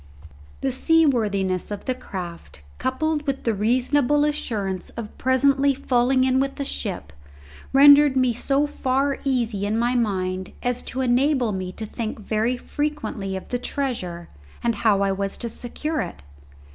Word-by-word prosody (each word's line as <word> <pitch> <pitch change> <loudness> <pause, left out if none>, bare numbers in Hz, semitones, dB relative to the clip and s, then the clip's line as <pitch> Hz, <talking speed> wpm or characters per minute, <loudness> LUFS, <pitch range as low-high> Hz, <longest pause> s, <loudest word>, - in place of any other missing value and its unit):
The 270 - 0
seaworthiness 225 - +2
of 205 -1 -6
the 255 - 0
craft, 175 - -8 0.2
coupled 300 +3 -1
with 275 -1 -2
the 230 - +1
reasonable 255 +7 +2
assurance 205 -11 -2
of 220 -2 -6
presently 275 +2 +3
falling 255 -1 +2
in 260 0 +3
with 275 +1 -2
a 280 - -1
ship, 195 - -4 0.6
rendered 285 0 +7
me 255 -2 +3
so 275 +5 +1
far 275 -1 0
easy 235 -7 0
in 210 +2 0
my 240 +2 +1
mind 190 -5 -1
as 245 0 0
to 260 - -3
enable 255 -1 +2
me 185 -2 -4
to 220 - -6
think 220 +1 -4
very 220 +4 0
frequently 290 -9 -3
of 190 - -7
the 245 - -1
treasure 205 -11 -4 0.4
and 235 - +2
how 205 -2 +2
I 195 0 +2
was 195 0 -2
to 235 - -4
secure 300 +7 -4
it. 70 - -7
245 Hz, 155 wpm, -23 LUFS, 205-275 Hz, 0.6 s, rendered